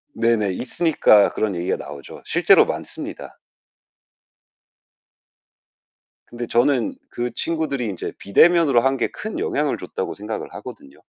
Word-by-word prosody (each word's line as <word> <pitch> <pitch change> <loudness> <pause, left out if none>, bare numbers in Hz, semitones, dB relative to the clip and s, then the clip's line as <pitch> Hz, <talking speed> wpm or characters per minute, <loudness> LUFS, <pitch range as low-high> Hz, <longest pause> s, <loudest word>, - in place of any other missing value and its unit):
네네. 115 -4 +1
있으니까 130 - +3
그런 105 -4 -1
얘기가 85 +1 -1
나오죠. 70 -1 -10
실제로 - - +5
많습니다. - - -7 2.9
근데 120 0 -5
저는 120 +1 +1 0.2
그 120 0 -3
친구들이 155 -6 -2
인제 95 -4 -5
비대면으로 145 - +4
한 135 +2 +1
게 120 - 0
큰 - - -6
영향을 - - -1
줬다고 - - -5
생각을 105 +1 -6
하거든요. 70 - -11
120 Hz, 285 characters per minute, -21 LUFS, 105-140 Hz, 2.9 s, 실제로